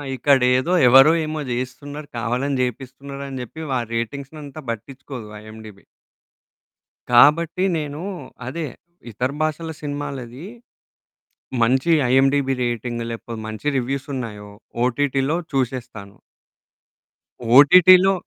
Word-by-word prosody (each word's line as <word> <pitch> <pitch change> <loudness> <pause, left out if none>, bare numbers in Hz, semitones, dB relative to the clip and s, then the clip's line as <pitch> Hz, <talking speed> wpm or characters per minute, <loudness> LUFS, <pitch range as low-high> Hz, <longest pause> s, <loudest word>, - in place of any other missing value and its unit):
ఇక్కడేదో 130 +4 +3
ఎవరో 135 +5 +8
ఏమో 155 0 -4
జేయిస్తున్నారు, 140 +4 -5
కావాలని 125 +5 -1
జేపిస్తున్నారని 135 +2 -5
చెప్పి 160 +7 -10
వా 130 - +1
రేటింగ్సనంతా 140 +5 -5
పట్టించుకోదు 125 +1 -8
ఐఎండీబీ. 110 -2 -12 1.3
కాబట్టి, 160 +8 +5
నేను 150 0 -5 0.5
అదే 160 +4 -4 0.5
ఇతర 125 +5 -2
భాషల 155 +1 -2
సినిమాలది. 145 -1 -6 1.2
మంచి 130 +7 +2 0.2
ఐఎండీబీ 135 +1 +3
రేటింగ్ 120 0 -3
లేకపోతే 115 0 -7
మంచి 110 +6 -6
రివ్యూసున్నాయో, 125 -5 -4 0.3
ఓటిటిలో 135 +3 0 0.2
చుసేస్తాను. 120 -6 -4 1.4
ఓటిటిలో 185 +6 +7
135 Hz, 85 wpm, -21 LUFS, 120-145 Hz, 1.4 s, ఎవరో